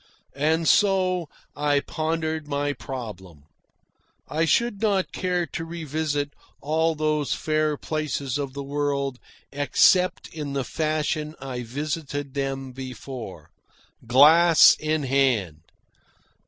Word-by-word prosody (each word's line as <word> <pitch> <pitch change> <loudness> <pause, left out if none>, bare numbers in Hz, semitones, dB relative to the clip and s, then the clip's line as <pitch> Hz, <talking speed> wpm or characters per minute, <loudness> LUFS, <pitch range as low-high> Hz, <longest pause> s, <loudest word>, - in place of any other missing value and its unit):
And 160 +3 +1
so 185 -5 +3 0.3
I 145 -1 +2
pondered 160 0 -3
my 145 0 -1
problem. 110 - -8 0.8
I 160 +2 0
should 220 +4 +1
not 200 -4 +1
care 180 -1 -1
to 165 +2 -6
revisit 155 -3 -3 0.3
all 160 +2 0
these 155 -1 0
fair 155 -1 0
places 145 -3 -3
of 140 -2 -4
the 140 0 -5
world 140 -2 -2 0.3
except 180 +6 +3
in 150 -3 -6
the 135 -1 -1
fashion 155 +1 -2
I 130 -2 -5
visited 145 +2 -4
them 135 -1 -3
before. 125 - -8 0.6
GLASS 160 +6 +7
IN 155 -1 -1
HAND! 125 - +1
145 Hz, 110 wpm, -24 LUFS, 135-160 Hz, 0.8 s, GLASS